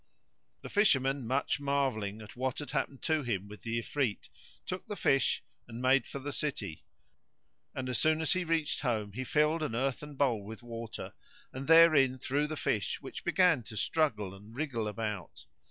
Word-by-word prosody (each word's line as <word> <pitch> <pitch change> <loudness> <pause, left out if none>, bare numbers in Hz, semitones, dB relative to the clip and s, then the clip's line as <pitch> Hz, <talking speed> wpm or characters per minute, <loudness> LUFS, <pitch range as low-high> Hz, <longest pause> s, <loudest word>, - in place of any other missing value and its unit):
The - - -6
Fisherman, 135 - +3
much 135 +3 +1
marvelling 130 -7 -1
at 105 - -12
what 130 0 -2
had 145 -4 -5
happened 135 - -2
to 155 -2 +2
him 105 -7 -2
with 105 +1 -11
the 115 0 -2
Ifrit, 115 -1 -2 0.4
took 185 0 -5
the 205 - -4
fish 135 -7 +2 0.2
and 115 - -8
made 130 0 +3
for - - -6
the 140 +1 -5
city; 115 - -3 0.9
and 130 -1 -3
as 125 -2 0
soon 155 0 +3
as 160 +1 +2
he 185 0 0
reached 165 -2 0
home 110 -6 -1
he 130 +5 -3
filled 150 +4 +2
an 150 -7 -2
earthen 135 +3 -2
bowl 125 -7 +1
with 110 +4 -9
water 115 -1 -7 0.4
and 135 +1 -6
therein 155 -6 +7
threw 140 +3 0
the 155 0 -4
fish 105 -8 -1
which - - -8
began 180 -7 +4
to 110 0 -9
struggle 110 -10 0
and 105 +4 -13
wriggle 125 -7 -2
about. 105 -4 -5
130 Hz, 180 wpm, -31 LUFS, 110-150 Hz, 0.9 s, therein